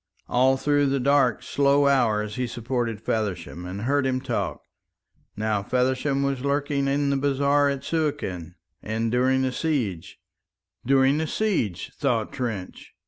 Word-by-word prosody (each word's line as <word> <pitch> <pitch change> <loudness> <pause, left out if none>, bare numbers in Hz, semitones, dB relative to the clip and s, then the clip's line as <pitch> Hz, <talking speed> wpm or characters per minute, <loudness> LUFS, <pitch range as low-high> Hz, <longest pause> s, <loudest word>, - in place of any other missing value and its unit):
All 130 +2 +3
through 145 +1 +2
the 135 0 +1
dark 135 -2 +2
slow 140 0 +2
hours 110 -6 +2
he 125 -1 -2
supported 120 -2 -3
Feversham 95 -6 -3
and 95 +3 -6
heard 135 +3 +1
him 130 -1 0
talk. - - -3 0.7
Now 105 -1 0
Feversham 130 +5 0
was 140 -2 -1
lurking 140 0 0
in 140 +1 +1
the 140 - +1
bazaar 140 +1 +2
at 140 -1 -3
Suakin 140 - -2 0.3
and 110 +1 -2
during 130 +2 +2
the 130 - 0
siege. 125 - -2 0.7
"During 135 +2 +3
the 160 - -1
siege," 160 - -1
thought 120 -7 -1
Trench. 115 -8 -5
130 Hz, 140 wpm, -25 LUFS, 110-140 Hz, 0.7 s, All